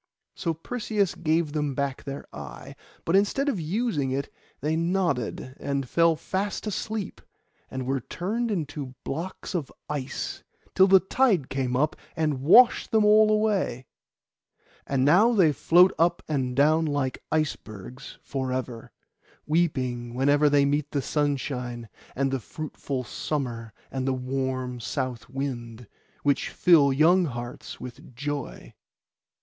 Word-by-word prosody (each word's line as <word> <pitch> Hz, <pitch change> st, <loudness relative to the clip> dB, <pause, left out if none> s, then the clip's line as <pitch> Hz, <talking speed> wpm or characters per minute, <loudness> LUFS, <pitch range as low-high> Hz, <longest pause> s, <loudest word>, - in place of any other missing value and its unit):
So 165 Hz, -2 st, -2 dB
Perseus 210 Hz, +2 st, -1 dB
gave 160 Hz, -2 st, 0 dB
them 150 Hz, -3 st, -1 dB
back 140 Hz, -1 st, -2 dB
their 140 Hz, 0 st, -6 dB
eye; -, -, -9 dB, 0.3 s
but 165 Hz, -, +2 dB
instead 205 Hz, +8 st, +2 dB
of 270 Hz, -10 st, 0 dB
using 165 Hz, -, -1 dB
it, 135 Hz, +1 st, -3 dB, 0.3 s
they 155 Hz, +3 st, 0 dB
nodded 165 Hz, -, -1 dB
and 140 Hz, -2 st, -2 dB
fell 165 Hz, +4 st, +3 dB
fast 195 Hz, +7 st, -3 dB
asleep, 215 Hz, -1 st, -4 dB, 0.5 s
and 130 Hz, -1 st, -4 dB
were 135 Hz, +1 st, 0 dB
turned 210 Hz, -, -3 dB
into 145 Hz, -8 st, -4 dB
blocks 170 Hz, +8 st, -5 dB
of 165 Hz, -7 st, -3 dB, 0.2 s
ice, 140 Hz, -3 st, -4 dB, 0.3 s
till 190 Hz, -, +6 dB
the 190 Hz, 0 st, +7 dB
tide 190 Hz, -, +2 dB
came 130 Hz, -2 st, -1 dB
up 150 Hz, +4 st, +1 dB, 0.2 s
and 155 Hz, -5 st, 0 dB
washed 235 Hz, -, +6 dB
them 220 Hz, -1 st, +3 dB
all 215 Hz, +1 st, +6 dB
away. 210 Hz, -, +1 dB, 1.0 s
And 135 Hz, -1 st, +1 dB
now 205 Hz, +11 st, +5 dB
they 180 Hz, -8 st, +5 dB
float 180 Hz, +6 st, +5 dB
up 170 Hz, +1 st, +2 dB
and 130 Hz, -5 st, -1 dB
down 155 Hz, +4 st, +4 dB
like 145 Hz, -3 st, -1 dB
icebergs 130 Hz, -5 st, -4 dB
for 130 Hz, -2 st, -3 dB
ever, 125 Hz, -3 st, -4 dB, 0.5 s
weeping 130 Hz, -7 st, 0 dB
whenever 145 Hz, +3 st, +4 dB
they 145 Hz, -1 st, +4 dB
meet 145 Hz, +1 st, 0 dB
the 140 Hz, -3 st, -2 dB
sunshine, 125 Hz, -5 st, -2 dB, 0.3 s
and 135 Hz, +1 st, 0 dB
the 135 Hz, -, 0 dB
fruitful 140 Hz, 0 st, -5 dB
summer 120 Hz, -4 st, -4 dB, 0.2 s
and 130 Hz, 0 st, -2 dB
the 135 Hz, -, +2 dB
warm 130 Hz, -1 st, -3 dB
south 120 Hz, +2 st, -4 dB
wind, 120 Hz, -3 st, -5 dB, 0.4 s
which 145 Hz, -1 st, +1 dB
fill 155 Hz, -6 st, +5 dB
young 170 Hz, +6 st, +4 dB
hearts 120 Hz, -3 st, -6 dB
with 125 Hz, 0 st, -10 dB
joy. 145 Hz, +1 st, -5 dB
145 Hz, 135 wpm, -26 LUFS, 130-170 Hz, 1.0 s, the